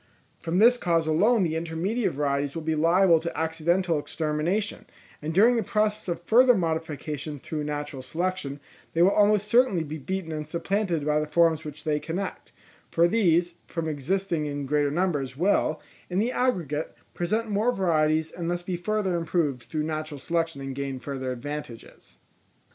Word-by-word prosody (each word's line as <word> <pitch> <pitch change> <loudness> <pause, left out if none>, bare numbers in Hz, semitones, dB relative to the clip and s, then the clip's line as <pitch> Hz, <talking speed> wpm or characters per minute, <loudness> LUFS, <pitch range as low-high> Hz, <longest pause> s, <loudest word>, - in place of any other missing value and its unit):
From 165 +2 -2
this 240 +5 +6
cause 165 -6 +1
alone 200 +8 +3
the 160 -2 0
intermediate 170 +8 -1
varieties 140 0 -1
will 165 - -4
be 160 0 0
liable 165 +2 +4
to 170 0 -4
accidental 165 +1 +1
extermination; 160 +8 -2 0.3
and 150 +1 -3
during 225 +8 +5
the - - +2
process 215 -1 0
of 175 -1 -3
further 245 +6 +6
modification 155 -4 -3
through 150 +2 -5
natural 145 -2 -4
selection, 160 0 -3 0.3
they 165 - +4
will 190 - +5
almost 210 0 +3
certainly 230 -6 +3
be 155 0 -6
beaten 185 +3 -4
and 155 -1 -4
supplanted 170 -1 -1
by 150 0 +2
the 150 - -2
forms 160 0 +3
which 150 -1 -9
they 150 -2 0
connect; 175 +6 -5 0.4
for 170 +1 +4
these, 175 -4 +2
from 165 -2 -3
existing 160 +2 -1
in 145 -1 -4
greater 145 +1 +1
numbers 145 -6 -1
will, 160 -3 +2 0.3
in 180 - -2
the 225 +5 +1
aggregate, 170 - -1 0.2
present 215 +6 -1
more 215 +4 +2
varieties, 160 -5 +1
and 170 -1 -4
thus 175 0 -2
be 180 0 -3
further 205 +1 -1
improved 165 -6 0
through 155 -1 -1
natural 155 -1 -4
selection 165 -1 -1
and 135 0 -5
gain 135 -1 -4
further 130 -1 -4
advantages. 125 -1 -8
165 Hz, 165 wpm, -26 LUFS, 150-190 Hz, 0.4 s, this